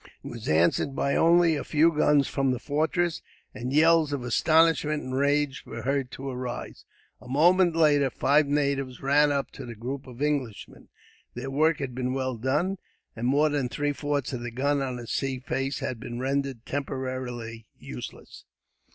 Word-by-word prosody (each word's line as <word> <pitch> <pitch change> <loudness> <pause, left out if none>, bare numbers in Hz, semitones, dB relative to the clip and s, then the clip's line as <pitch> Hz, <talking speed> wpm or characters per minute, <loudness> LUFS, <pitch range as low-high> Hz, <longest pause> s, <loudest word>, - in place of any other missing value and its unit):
It - - -8
was 120 -2 -8
answered 85 - +2
by 140 - 0
only 170 0 +4
a - - -3
few 160 +2 +3
guns 150 -2 +3
from 135 -1 0
the 125 - 0
fortress, 160 +5 -1 0.3
and 125 0 -5
yells 160 +1 +4
of 140 -3 -3
astonishment 155 +3 +3
and 130 - -6
rage 140 0 +1
were - - -8
heard 135 -1 -1
to 135 - -7
arise. 125 -2 -6 0.4
A - - -13
moment 175 +6 +4
later, 145 -4 +4
five 145 +3 +2
natives 140 -3 -1
ran 145 +2 +4
up 140 -1 -1
to - - -9
the 120 -1 -8
group 130 +5 -6
of 125 -1 -11
Englishmen. 140 -7 -3 0.5
Their 130 +2 -5
work 155 +3 +2
had 135 -3 -4
been 130 +1 -2
well 130 -1 -2
done, 150 - -1 0.4
and 120 +1 -2
more 145 +4 +3
than 145 -4 -1
three 145 +3 -1
fourths 145 -1 -2
of 125 - -4
the 120 - -4
guns 140 +4 0
on 130 -2 -2
the 120 -1 -7
sea 135 +3 -2
face 135 +2 -3
had 125 - -3
been 120 0 -6
rendered 135 -2 -2
temporarily 130 -5 -5
useless. 60 -1 -9
135 Hz, 175 wpm, -26 LUFS, 125-150 Hz, 0.5 s, only